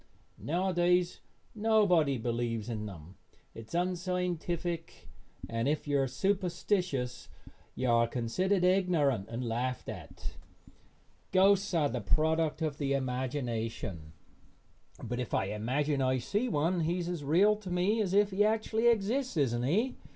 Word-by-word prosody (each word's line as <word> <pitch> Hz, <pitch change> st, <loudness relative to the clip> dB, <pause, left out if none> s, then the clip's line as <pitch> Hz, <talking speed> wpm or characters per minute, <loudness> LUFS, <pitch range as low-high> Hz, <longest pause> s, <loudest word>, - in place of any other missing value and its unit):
Nowadays 180 Hz, +1 st, +1 dB, 0.3 s
nobody 205 Hz, -, +3 dB
believes 115 Hz, -1 st, -2 dB
in 105 Hz, -2 st, -3 dB
them. 90 Hz, -2 st, -11 dB, 0.4 s
It 115 Hz, -1 st, -10 dB
is -, -, -7 dB
unscientific, 175 Hz, -2 st, -2 dB, 0.4 s
and 115 Hz, +2 st, -1 dB
if 150 Hz, +1 st, -1 dB
you 145 Hz, -1 st, +2 dB
are 135 Hz, -, +1 dB
superstitious 175 Hz, -3 st, -1 dB, 0.5 s
you 130 Hz, -, -1 dB
are 115 Hz, 0 st, +4 dB
considered 180 Hz, -, 0 dB
ignorant 170 Hz, -, +2 dB
and 120 Hz, +1 st, -4 dB
laughed 125 Hz, +3 st, -2 dB
at. -, -, -8 dB, 0.9 s
Ghosts 195 Hz, +1 st, +4 dB
are 155 Hz, -3 st, +3 dB
the 125 Hz, -1 st, -3 dB
product 160 Hz, +6 st, +1 dB
of 150 Hz, -2 st, -2 dB
the 140 Hz, -2 st, 0 dB
imagination, 120 Hz, -, -3 dB, 0.9 s
but 120 Hz, 0 st, -3 dB
if 125 Hz, -, -2 dB
I -, -, +1 dB
imagine 135 Hz, +7 st, -1 dB
I 130 Hz, 0 st, +2 dB
see 205 Hz, -, -1 dB
one 165 Hz, +4 st, +1 dB
he 170 Hz, +2 st, 0 dB
is 175 Hz, -1 st, -3 dB
as 175 Hz, -4 st, -4 dB
real 185 Hz, +9 st, +4 dB
to 205 Hz, -3 st, -9 dB
me 185 Hz, +5 st, +1 dB
as 195 Hz, -2 st, 0 dB
if 205 Hz, 0 st, +4 dB
he 195 Hz, +2 st, +3 dB
actually 220 Hz, +1 st, +1 dB
exists, 235 Hz, +1 st, +1 dB
isn't 120 Hz, -5 st, +1 dB
he? 210 Hz, -, +1 dB
155 Hz, 140 wpm, -31 LUFS, 125-185 Hz, 0.9 s, are